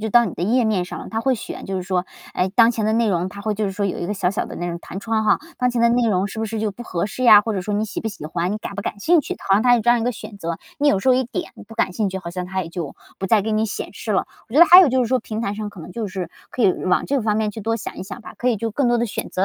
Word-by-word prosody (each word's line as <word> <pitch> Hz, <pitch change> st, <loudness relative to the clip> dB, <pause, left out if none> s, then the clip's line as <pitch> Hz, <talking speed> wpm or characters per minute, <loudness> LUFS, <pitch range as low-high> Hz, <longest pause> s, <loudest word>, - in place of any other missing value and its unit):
就 220 Hz, -, -2 dB
到 235 Hz, +2 st, +5 dB
你 190 Hz, -, -4 dB
的 -, -, -5 dB
页 235 Hz, +6 st, +2 dB
面 215 Hz, -4 st, +1 dB
上 -, -, -7 dB
了， -, -, -8 dB
它 225 Hz, -, -1 dB
会 260 Hz, +2 st, +2 dB
选 220 Hz, -, -7 dB
就 195 Hz, -, -3 dB
是 185 Hz, -, -2 dB
说， 180 Hz, 0 st, -1 dB, 0.3 s
哎， 185 Hz, -, 0 dB
当 230 Hz, +1 st, +6 dB
前 220 Hz, -3 st, -1 dB
的 220 Hz, -, +2 dB
内 230 Hz, 0 st, +2 dB
容 180 Hz, -3 st, 0 dB
它 200 Hz, +2 st, -10 dB
会 215 Hz, +1 st, 0 dB
就 210 Hz, 0 st, -1 dB
是 195 Hz, -, -3 dB
说 200 Hz, +1 st, -2 dB
有 190 Hz, -, -2 dB
一 175 Hz, -, -3 dB
个 205 Hz, -, -2 dB
小 185 Hz, -2 st, 0 dB
小 195 Hz, -, -2 dB
的 -, -, -8 dB
那 175 Hz, -, -3 dB
种 170 Hz, -1 st, -4 dB
弹 190 Hz, -, -7 dB
窗 220 Hz, 0 st, -1 dB
哈， 210 Hz, -, +4 dB, 0.2 s
当 250 Hz, -, +2 dB
前 240 Hz, -1 st, 0 dB
的 235 Hz, -, +5 dB
内 240 Hz, -1 st, +2 dB
容 190 Hz, -2 st, +1 dB
是 205 Hz, -, -8 dB
不 220 Hz, -, -1 dB
是 220 Hz, +1 st, -4 dB
就 215 Hz, 0 st, 0 dB
不 220 Hz, +5 st, -9 dB
合 175 Hz, -6 st, -2 dB
适 215 Hz, +5 st, -5 dB
呀， 215 Hz, -4 st, +8 dB
或 225 Hz, -, -2 dB
者 195 Hz, -, -2 dB
说 205 Hz, +3 st, -3 dB
你 215 Hz, +1 st, +1 dB
喜 215 Hz, -, -5 dB
不 225 Hz, -, -2 dB
喜 195 Hz, -8 st, -9 dB
欢， 170 Hz, +3 st, -2 dB
你 210 Hz, -, -1 dB
感 210 Hz, -2 st, -7 dB
不 200 Hz, -, -4 dB
感 205 Hz, -, -4 dB
兴 330 Hz, +10 st, +4 dB
趣， -, -, -5 dB
它 -, -, -15 dB
好 -, -, +4 dB
像 200 Hz, +2 st, +4 dB
它 245 Hz, -1 st, +6 dB
有 235 Hz, -, +1 dB
这 240 Hz, -, +4 dB
样 240 Hz, -1 st, +4 dB
一 -, -, -2 dB
个 245 Hz, -, +1 dB
选 210 Hz, -2 st, -9 dB
择。 170 Hz, -3 st, -3 dB, 0.2 s
你 295 Hz, 0 st, +3 dB
有 200 Hz, -, +3 dB
时 260 Hz, +6 st, +2 dB
候 -, -, +6 dB
一 260 Hz, -, +2 dB
点 350 Hz, +9 st, -5 dB, 0.2 s
“不 225 Hz, -, -10 dB
感 205 Hz, -, 0 dB
兴 210 Hz, +1 st, 0 dB
趣”， 190 Hz, -, -5 dB
好 185 Hz, -2 st, -6 dB
像 180 Hz, +1 st, -4 dB
它 190 Hz, 0 st, -2 dB
也 165 Hz, -, -8 dB
就 165 Hz, -5 st, -5 dB, 0.2 s
不 195 Hz, -, -2 dB
再 210 Hz, +1 st, +4 dB
给 220 Hz, +2 st, -2 dB
你 215 Hz, +1 st, +1 dB
显 205 Hz, -, -5 dB
示 215 Hz, 0 st, -4 dB
了。 190 Hz, -, +1 dB, 0.2 s
我 225 Hz, -, -10 dB
觉 -, -, +4 dB
得 340 Hz, -, +11 dB
还 355 Hz, +2 st, +10 dB
有 360 Hz, -, +6 dB
就 260 Hz, 0 st, +2 dB
是 -, -, -2 dB
说 255 Hz, +1 st, +2 dB
平 220 Hz, -1 st, -5 dB
台 200 Hz, -, -1 dB
上 210 Hz, 0 st, -4 dB
可 200 Hz, -3 st, -11 dB
能 175 Hz, -, -10 dB
就 225 Hz, -1 st, -3 dB
是 185 Hz, -3 st, -5 dB, 0.2 s
可 250 Hz, -, -3 dB
以 190 Hz, -3 st, +5 dB
往 180 Hz, -, +2 dB
这 285 Hz, -, -2 dB
个 -, -, +1 dB
方 210 Hz, -1 st, +1 dB
面 215 Hz, -1 st, 0 dB
去 220 Hz, +2 st, -8 dB
多 225 Hz, +2 st, -1 dB
想 225 Hz, -, -7 dB
一 -, -, -4 dB
想 210 Hz, +5 st, -8 dB
吧， -, -, -10 dB
可 250 Hz, -, +1 dB
以 235 Hz, -, +2 dB
就 225 Hz, +2 st, -3 dB
更 255 Hz, +3 st, +1 dB
多 240 Hz, -, +3 dB
的 235 Hz, -, +1 dB
选 220 Hz, -, -4 dB
择。 185 Hz, -, 0 dB
215 Hz, 405 characters per minute, -21 LUFS, 190-235 Hz, 0.3 s, 得